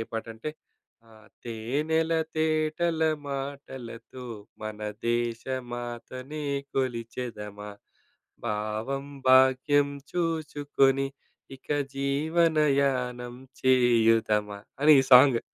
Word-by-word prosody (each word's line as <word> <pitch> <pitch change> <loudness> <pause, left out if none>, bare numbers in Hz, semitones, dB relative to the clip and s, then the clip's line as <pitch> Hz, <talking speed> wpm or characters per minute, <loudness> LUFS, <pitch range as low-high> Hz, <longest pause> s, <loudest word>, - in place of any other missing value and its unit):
ఏ - - 0
పాటంటే, 115 +5 -5 0.6
ఆహ్, 110 -1 -18 0.2
తేనెల 145 +8 -1 0.2
తేటల 155 +1 0 0.3
మాటలతో, 135 -3 -7 0.4
మన 110 0 -5 0.3
దేశ 120 -1 0 0.3
మాతని 130 +5 -6 0.3
కొలిచెదమా. 115 -5 -4 0.8
భావం 110 +6 -3 0.2
భాగ్యం 130 +2 +5 0.2
చూసుకొని, 145 -5 +1 0.5
ఇక - - -31 0.3
జీవనయానం 140 -4 +1 0.3
చేయుదమా. 115 -5 +3 0.2
అని 155 +1 +8
ఈ - - +1
సాంగ్. 125 -1 +8
130 Hz, 75 wpm, -27 LUFS, 115-145 Hz, 0.8 s, అని